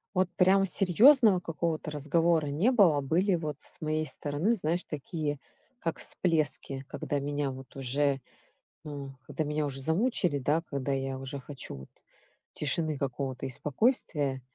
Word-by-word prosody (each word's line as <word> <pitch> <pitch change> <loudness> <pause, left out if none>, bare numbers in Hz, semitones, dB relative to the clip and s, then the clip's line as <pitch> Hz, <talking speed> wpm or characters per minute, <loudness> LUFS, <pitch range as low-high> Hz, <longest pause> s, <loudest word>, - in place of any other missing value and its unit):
Вот 185 -1 +2
прям 195 +1 +5
серьезного 210 - +6
какого-то 165 -2 -3
разговора 160 +2 +2
не 165 - +2
было. 180 - +5
Были 175 +7 +2
вот 155 -4 -4
с - - -7
моей 155 0 -1
стороны, 150 +12 -1
знаешь, 175 -3 -1
такие 150 0 -4 0.4
как 165 - -3
всплески, 150 -5 0
когда 145 - -3
меня 145 0 -2
вот 130 +1 -12
уже, 135 +1 +1 0.6
э, 145 -3 -6 0.2
когда 155 - -2
меня 150 0 -1
уже 135 -1 -2
замучили, 170 - +1
да, 150 +5 +1
когда 140 -1 -2
я 135 -1 -2
уже 135 +1 -5
хочу 135 - -7
вот 65 0 -11 0.6
тишины 155 +1 0
какого-то 135 -1 -3
и - - -3
спокойствия. 145 - 0
150 Hz, 145 wpm, -29 LUFS, 140-170 Hz, 0.6 s, серьезного